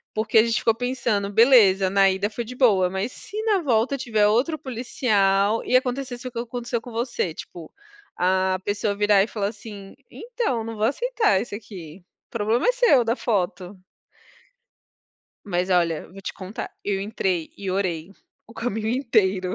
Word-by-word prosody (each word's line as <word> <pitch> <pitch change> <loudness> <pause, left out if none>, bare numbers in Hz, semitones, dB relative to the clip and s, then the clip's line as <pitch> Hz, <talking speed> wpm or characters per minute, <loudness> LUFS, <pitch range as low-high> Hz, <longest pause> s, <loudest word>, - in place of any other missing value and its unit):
Porque 220 +1 +1
a - - +6
gente 230 0 0
ficou 225 - +2
pensando: 235 -5 -1
"Beleza, 205 -5 +5
na 195 0 +5
ida 190 +2 -1
foi 235 +3 -4
de 250 +3 -9
boa, 200 -8 +3
mas 190 +6 -3
se 420 +10 -8
na 425 -3 +2
volta 250 -2 +1
tiver 220 -5 +1
outro 250 +10 +1
policial 220 -5 +1
e, 255 - +1
acontecesse 255 -1 -4
o 250 - -7
que 235 - -5
aconteceu 240 0 -4
com 245 - -11
você.", 230 -7 -2
tipo, 165 0 -10 0.5
a 185 +1 +1
pessoa 205 0 -1
virar 205 -1 +4
e - - -3
falar, 205 -3 -2
assim: 205 -2 -11 0.2
"Então, 455 - -3
não 225 - -6
vou 210 - -3
aceitar 440 - +1
isso, 230 - -6
aqui, 185 -5 -10 0.3
problema 230 - 0
é - - +6
seu 480 - +4
da 230 +1 +1
foto.". 195 -5 -2 1.7
Mas, 180 -1 -1
olha, 170 -3 +1
vou 195 +2 -12
te - - -4
contar, 190 +3 -7
eu 200 -1 -1
entrei 190 -5 -2
e 195 - -5
orei, 185 -2 -2 0.3
o 230 - -16
caminho 220 -2 -3
inteiro. 205 -7 +1
215 Hz, 170 wpm, -23 LUFS, 195-245 Hz, 1.7 s, a